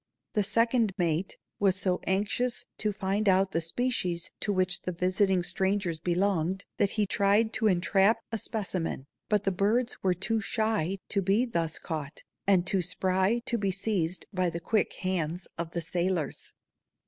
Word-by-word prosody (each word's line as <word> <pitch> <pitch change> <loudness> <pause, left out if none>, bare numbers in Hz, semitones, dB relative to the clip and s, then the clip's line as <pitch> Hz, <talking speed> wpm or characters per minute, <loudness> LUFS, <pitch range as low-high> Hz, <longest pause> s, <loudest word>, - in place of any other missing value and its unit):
The 210 - +2
second 230 0 +2
mate 175 0 0 0.2
was 195 -2 +3
so 185 -1 0
anxious 210 +6 0
to 215 - +1
find 200 +1 0
out 190 0 +3
the 165 - 0
species 180 -2 -1
to 210 - -1
which 185 -1 +1
the 180 - -3
visiting 185 +1 +1
strangers 185 -1 0
belonged 180 +1 0
that 200 - +3
he 210 - +3
tried 205 +3 +2
to 220 - +1
entrap 195 +3 +3
a 225 - -2
specimen, 185 - -3 0.2
but 210 -2 +2
the 195 - +1
birds 215 +6 0
were 185 -2 +2
too 215 +5 -1
shy 210 -4 0
to 200 - +2
be 200 +6 +2
thus 165 -9 -1
caught 155 -2 -6 0.2
and 185 -3 +4
too 190 0 +1
spry 190 +5 +1
to 240 -3 0
be 200 -1 0
seized 190 -3 -1
by 185 -2 +1
the 170 - -4
quick 210 +5 0
hands 180 -2 -2
of 170 -1 -4
the 170 0 -4
sailors. 170 -2 -2
190 Hz, 165 wpm, -29 LUFS, 175-210 Hz, 0.2 s, and